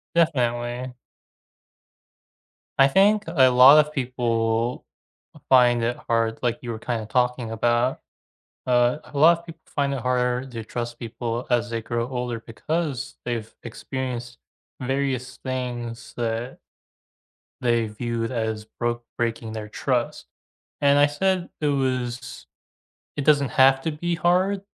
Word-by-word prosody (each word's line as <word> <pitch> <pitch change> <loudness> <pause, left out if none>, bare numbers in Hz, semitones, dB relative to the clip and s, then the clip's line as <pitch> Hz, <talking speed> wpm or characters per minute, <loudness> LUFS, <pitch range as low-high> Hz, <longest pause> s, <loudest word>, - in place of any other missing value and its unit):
Definitely. 125 -5 0 1.8
I 135 0 +7
think 205 +7 +4
a 140 -6 +5
lot 130 +4 +8
of 150 - -12
people 120 -3 -1 0.6
find 120 -2 +5
it 120 +1 0
hard, 115 -1 +1
like 120 0 0
you 120 - -5
were 110 - -4
kinda 115 -1 -3
talking 125 0 0
about. 120 +3 +1 0.7
Uh, 125 +1 +3
a 150 - -11
lot 165 +3 +6
of 170 - -17
people 165 -1 -11
find 140 -1 -1
it 135 - -3
harder 125 0 0
to 115 -4 -7
trust 120 +1 -5
people 115 +1 -4
as 120 -1 +1
they 115 0 -2
grow 115 +1 -2
older, 125 -2 -3
because 140 +3 -3
they've 115 -3 -4
experienced 120 0 -5 0.4
various 130 -1 -2
things 120 -3 -5
that 115 +1 -3 1.0
they 120 -2 +2
viewed 115 +1 -3
as 110 -3 -2
broke 120 +2 -3
breaking 115 -1 -2
their 110 -1 -6
trust. 120 +2 -2 0.6
And 140 0 +5
I 145 - +6
said 185 +4 0
it 150 - 0
was 130 -3 0
s 125 -1 -10 0.7
It 145 - -3
doesn't 145 -3 +4
have 135 0 +5
to 160 - -2
be 170 +3 -2
hard 185 +4 +1
125 Hz, 135 wpm, -24 LUFS, 120-140 Hz, 1.8 s, lot